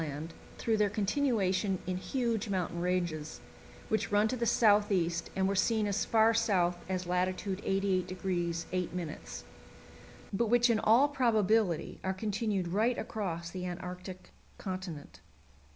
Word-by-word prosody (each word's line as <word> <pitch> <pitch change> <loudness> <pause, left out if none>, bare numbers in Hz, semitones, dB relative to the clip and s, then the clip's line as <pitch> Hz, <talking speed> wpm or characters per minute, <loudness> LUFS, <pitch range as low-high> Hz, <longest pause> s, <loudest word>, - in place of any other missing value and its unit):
Land 155 +1 -5 0.2
through 225 -1 +1
their 210 -1 +3
continuation 205 -3 +1
in 185 0 -2
huge 230 0 -1
mountain 180 -3 -2
ranges, 175 -4 -2 0.5
which 220 - -1
run 205 +1 +4
to 255 - -1
the 235 -1 -1
south 210 -2 +4
east 170 -3 0
and 190 0 +2
were 195 - +1
seen 215 +3 +2
as 205 0 0
far 225 0 +4
south 195 -6 +2
as 185 -1 -2
lat. 180 +1 +1
88° 185 -3 -1
8', 180 -3 -4 0.9
but 230 +4 +1
which 240 +1 +4
in 220 - +2
all 235 +7 +5
probability 220 - +1
are 190 0 -1
continued 205 -2 -1
right 220 +7 +1
across 170 -6 -4
the 180 0 -4
Antarctic 180 +1 -7 0.3
Continent. 185 -6 -6
190 Hz, 135 wpm, -31 LUFS, 180-220 Hz, 0.9 s, all